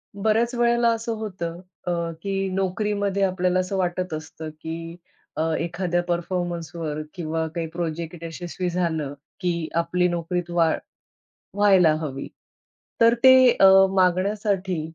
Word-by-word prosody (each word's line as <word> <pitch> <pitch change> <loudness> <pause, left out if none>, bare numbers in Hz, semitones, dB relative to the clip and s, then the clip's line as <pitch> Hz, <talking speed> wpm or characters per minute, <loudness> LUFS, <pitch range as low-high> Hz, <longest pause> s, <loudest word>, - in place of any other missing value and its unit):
बऱ्याच 220 +4 +1
वेळेला 235 0 +3
असं 230 0 -3
होतं, 180 -6 -5 0.3
अ, - - +1 0.3
की 195 0 -1
नोकरीमध्ये 200 +1 0
आपल्याला 185 -1 +1
असं 185 +1 -2
वाटत 180 -1 -1
असतं, 155 0 -6
की 165 +1 -6 0.4
अ, - - +1 0.2
एखाद्या 175 +1 -1
परफॉर्मन्सवर 170 -3 -3
किंवा 160 -2 -2
काही 165 -1 -2
प्रोजेक्ट 170 0 -4
यशस्वी 175 +2 -4
झालं, 165 -5 -1 0.3
की 170 -3 -1
आपली 180 +2 +1
नोकरीत 175 0 -2
वाढ 165 -2 +2 0.8
व्हायला 190 -5 +5
हवी. 135 -4 -5 0.7
तर 230 0 +6
ते 260 0 +10 0.3
अ, 195 - +9 0.2
मागण्यासाठी 190 0 +1
180 Hz, 120 wpm, -24 LUFS, 165-195 Hz, 0.8 s, ते